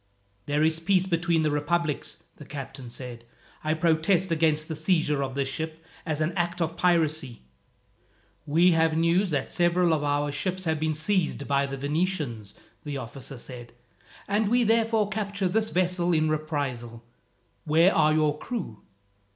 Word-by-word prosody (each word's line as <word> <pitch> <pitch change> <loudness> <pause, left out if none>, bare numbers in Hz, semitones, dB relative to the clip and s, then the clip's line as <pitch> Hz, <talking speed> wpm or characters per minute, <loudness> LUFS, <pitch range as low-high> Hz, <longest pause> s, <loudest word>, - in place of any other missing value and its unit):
"There 150 +1 +1
is 160 0 +2
peace 185 +2 +2
between 170 -2 +1
the 155 - +1
republics," 150 +1 -1
the - - -10
captain 135 -3 -8
said. 120 -1 -8 0.4
"I 155 +1 +1
protest 165 +3 +2
against 155 -1 +2
the 160 - -4
seizure 155 -2 +1
of 135 -1 -3
this 140 -1 0
ship, 160 +3 -5 0.2
as 155 -1 -1
an 155 +2 +1
act 175 0 -1
of 165 -1 -1
piracy." 155 - 0 1.0
"We 170 +5 +5
have 160 -1 +2
news 170 +4 +2
that 145 -4 -2
several 175 -1 +3
of 150 -2 0
our 145 0 0
ships 185 +6 -2
have 160 -1 0
been 155 0 0
seized 160 -3 0
by 140 0 +2
the 135 0 -5
Venetians," 140 - -2 0.3
the 145 -2 -4
officer 130 +2 -7
said; 120 -1 -10 0.5
"and 205 +1 +1
we 245 +1 +3
therefore 225 -1 +2
capture 200 -2 -2
this 220 +4 +1
vessel 180 -1 +1
in 155 -1 +2
reprisal. 140 -7 -3 0.6
Where 165 +5 +4
are 155 -1 +4
your 155 -1 +1
crew?" 180 - -5
160 Hz, 160 wpm, -26 LUFS, 145-175 Hz, 1.0 s, We